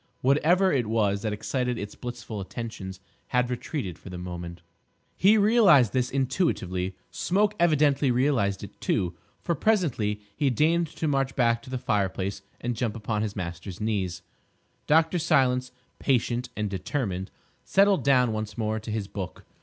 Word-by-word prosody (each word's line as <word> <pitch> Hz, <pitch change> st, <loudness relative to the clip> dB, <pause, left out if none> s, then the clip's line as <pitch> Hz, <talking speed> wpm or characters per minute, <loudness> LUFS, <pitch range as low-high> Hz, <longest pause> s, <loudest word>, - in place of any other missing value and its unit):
Whatever 170 Hz, +8 st, +4 dB
it 125 Hz, -5 st, +1 dB
was 105 Hz, -3 st, +1 dB
that 110 Hz, -, -1 dB
excited 125 Hz, +3 st, -2 dB
its 100 Hz, -1 st, -5 dB
blissful 120 Hz, -4 st, -6 dB
attentions 95 Hz, -2 st, -6 dB, 0.3 s
had 125 Hz, 0 st, +1 dB
retreated 120 Hz, -, -4 dB
for -, -, -11 dB
the 90 Hz, -, -6 dB
moment. 85 Hz, -1 st, -7 dB, 0.5 s
He 205 Hz, +4 st, +5 dB
realised 200 Hz, -, +5 dB
this 125 Hz, -1 st, +1 dB
intuitively. 125 Hz, -, -1 dB, 0.2 s
Smoke 205 Hz, +3 st, +1 dB
evidently 150 Hz, -4 st, +3 dB
realised 120 Hz, -6 st, +1 dB
it, -, -, -11 dB
too, 90 Hz, -2 st, 0 dB, 0.3 s
for 170 Hz, -, +1 dB
presently 140 Hz, -, +1 dB, 0.2 s
he 145 Hz, -, +2 dB
deigned 160 Hz, +6 st, +2 dB
to 160 Hz, +1 st, -4 dB
march 135 Hz, -2 st, 0 dB
back 115 Hz, -2 st, +2 dB
to 130 Hz, -, -13 dB
the 130 Hz, -, -2 dB
fireplace 95 Hz, -3 st, -1 dB, 0.2 s
and 120 Hz, 0 st, -2 dB
jump 115 Hz, -2 st, -2 dB
upon 105 Hz, -1 st, -2 dB
his 105 Hz, -2 st, -3 dB
master's 85 Hz, 0 st, -6 dB
knees. 95 Hz, -5 st, -2 dB, 0.6 s
Dr. 160 Hz, +3 st, +4 dB
Silence, 130 Hz, -4 st, +2 dB, 0.3 s
patient 125 Hz, -1 st, 0 dB
and 105 Hz, 0 st, 0 dB
determined, 95 Hz, 0 st, -3 dB, 0.3 s
settled 195 Hz, 0 st, +3 dB
down 125 Hz, -4 st, +4 dB
once 110 Hz, -1 st, -4 dB
more 110 Hz, -1 st, -1 dB
to 110 Hz, -, -9 dB
his 105 Hz, -2 st, -2 dB
book. 95 Hz, -2 st, -7 dB
120 Hz, 155 wpm, -27 LUFS, 100-140 Hz, 0.6 s, He